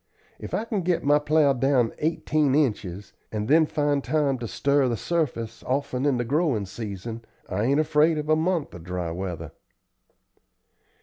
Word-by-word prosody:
If - - -5
I 220 - -1
can 215 -4 -2
get 175 -1 0
my 145 +1 +4
plow 150 -1 +3
down 130 -2 +2
eighteen 150 -3 +1
inches, 105 - -1 0.2
and 105 -1 -3
then 160 +3 +5
find 145 -2 0
time 140 -1 +1
to 120 - -4
stir 140 +3 +2
the 120 -2 -1
surface 115 - -2
often 130 0 -1
in 135 -3 +2
the 120 - -1
growin' 140 - +1
season, 110 +2 -6 0.2
I 100 +4 -1
ain't 140 +4 +3
afraid 155 +1 +3
of 150 0 -3
a 155 - +4
month 165 0 -1
of 85 - -10
dry 90 -1 -3
weather." 90 -1 -5
140 Hz, 170 wpm, -25 LUFS, 110-155 Hz, 0.2 s, then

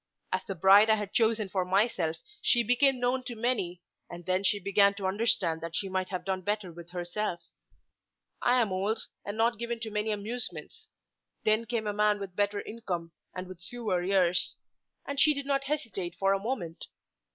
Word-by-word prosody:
As - - 0
the 195 - -4
bride 195 +5 +7
I 220 - +6
had 210 -2 -5
chosen 220 -2 +2
for 190 -1 -1
myself 180 -4 +1 0.2
she 240 -1 +4
became 250 +3 +3
known 250 +1 +1
to 240 - -4
many, 200 -7 -1 0.3
and 175 0 -9
then 185 +1 +1
she 205 - +3
began 200 +1 +3
to 200 -1 -5
understand 190 -5 +1
that 165 0 -5
she 195 - -1
might 185 0 -2
have 180 -2 -4
done 190 -1 -1
better 205 -1 -2
with 170 0 -11
herself. 175 +1 -3 1.0
I 250 +1 +4
am 220 -5 +1
old, 200 +4 -1 0.2
and 205 +1 -5
not 230 0 +2
given 235 0 -3
to 220 -1 -4
many 210 +1 -1
amusements. 215 - -4 0.6
Then 215 +2 +2
came 235 -3 -2
a 210 - -1
man 210 0 +2
with 200 -2 -6
a - - -37
better 205 +1 0
income 180 -7 -5 0.2
and 185 0 -4
with 185 -2 -11
fewer 210 -2 -2
years; 180 -1 +3 0.5
and 280 -1 -3
she 300 +1 +5
did 280 0 -3
not 275 -1 0
hesitate 225 - -3
for 195 0 +3
a 195 - 0
moment. 195 -7 -4
205 Hz, 195 wpm, -29 LUFS, 185-230 Hz, 1.0 s, bride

